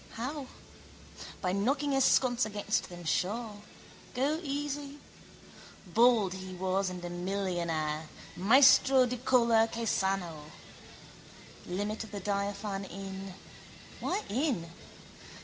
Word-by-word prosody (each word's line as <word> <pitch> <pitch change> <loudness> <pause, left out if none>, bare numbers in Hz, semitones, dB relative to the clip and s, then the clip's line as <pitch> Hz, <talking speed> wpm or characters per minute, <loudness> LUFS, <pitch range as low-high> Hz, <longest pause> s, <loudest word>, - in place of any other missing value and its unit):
How? 265 +4 -4 0.9
By 180 - 0
knocking 275 +9 0
his 270 -1 +3
sconce 250 -1 +3
against 210 0 -1
them, 175 -1 -9
sure. 205 +5 -1 0.5
Go 285 +5 +1
easy. 290 -1 -4 0.9
Bald 220 0 +4
he 185 0 -7
was 190 +1 0
and 180 -1 -7
a - - -4
millionaire, 175 -4 -2 0.3
maestro 260 +6 +6
di 250 0 -3
color 235 -2 +4
che 230 0 -4
sanno. 190 -7 -1 1.2
Limit 205 +5 -3
of - - -13
the 205 - -5
diaphane 200 0 -2
in. 195 0 -7 0.6
Why 400 +4 -2
in? 245 - 0
205 Hz, 110 wpm, -31 LUFS, 185-250 Hz, 1.2 s, maestro